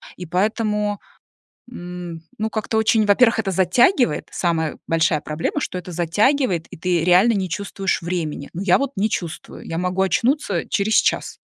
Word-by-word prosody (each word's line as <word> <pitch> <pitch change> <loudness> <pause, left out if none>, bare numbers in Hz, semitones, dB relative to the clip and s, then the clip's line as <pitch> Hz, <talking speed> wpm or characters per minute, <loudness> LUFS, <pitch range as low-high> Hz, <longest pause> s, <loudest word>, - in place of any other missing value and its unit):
И 180 - -8
поэтому, 210 +3 0 0.7
м, 175 -4 -7 0.2
ну, 220 +1 -1
как-то 220 0 -2
очень, 220 0 +3
во-первых, 225 +3 +4
это 200 -3 -1
затягивает, 190 - +2
самая 160 -3 -1
большая 160 -1 +2
проблема, 160 - -3
что 180 - -3
это 180 0 -9
затягивает, 180 - +1
и - - -11
ты 175 -1 0
реально 185 +6 +5
не 190 -3 -1
чувствуешь 195 -1 -2
времени. 165 -5 -3
Ну, 175 - -5
я 185 -2 +4
вот 275 -1 -2
не 215 +3 +1
чувствую. 170 -5 -6
Я 165 - -3
могу 180 +1 -1
очнуться 205 - 0
через 210 +2 0
час. - - +1
185 Hz, 160 wpm, -21 LUFS, 170-215 Hz, 0.7 s, реально